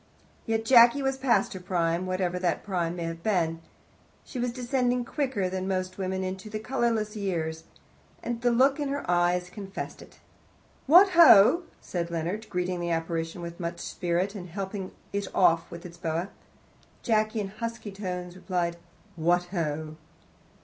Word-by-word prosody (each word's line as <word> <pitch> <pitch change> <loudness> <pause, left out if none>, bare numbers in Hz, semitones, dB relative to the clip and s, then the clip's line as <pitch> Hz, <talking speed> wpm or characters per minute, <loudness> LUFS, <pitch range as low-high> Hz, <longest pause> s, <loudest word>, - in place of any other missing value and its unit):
Yes, 225 0 +1
Jacky 240 +3 +6
was 270 0 +1
past 235 -7 +2
her 190 - -6
prime, 175 -1 -1
whatever 185 -1 -1
that 180 -2 0
prime 175 -4 -1
may 175 - -4
have 165 0 -5
been. 165 -5 0 0.6
She 255 - -6
was 245 0 0
descending 250 0 0
quicker 260 -9 -1
than 185 0 -3
most 185 0 -2
women 190 0 -2
into 190 +2 -5
the 215 - -4
colourless 225 -2 -1
years, 165 -6 -3 0.6
and 240 -1 -3
the 245 - +3
look 265 +4 +3
in 290 - -1
her 285 +1 -3
eyes 175 0 +1
confessed 195 -1 -7
it. - - -15 0.7
"What 360 +7 +8
ho!" 335 - +7 0.2
said 170 -2 -3
Leonard, 175 +6 -3
greeting 180 0 -2
that 175 - -3
apparition 165 +1 -2
with 170 +1 -7
much 170 0 -3
spirit, 175 +3 -2
and 185 -4 -8
helping 190 +1 -5 0.2
it 200 -1 -2
off 165 -2 +3
with 170 +1 -9
its 170 -1 -10
boa. 170 +1 -2 0.7
Jacky, 215 -1 +1
in 200 -2 -3
husky 230 0 -6
tones, 180 -3 -5
replied, 175 -2 -2 0.4
"What 175 +2 +2
ho!" 155 -3 -3
185 Hz, 160 wpm, -27 LUFS, 175-225 Hz, 0.7 s, What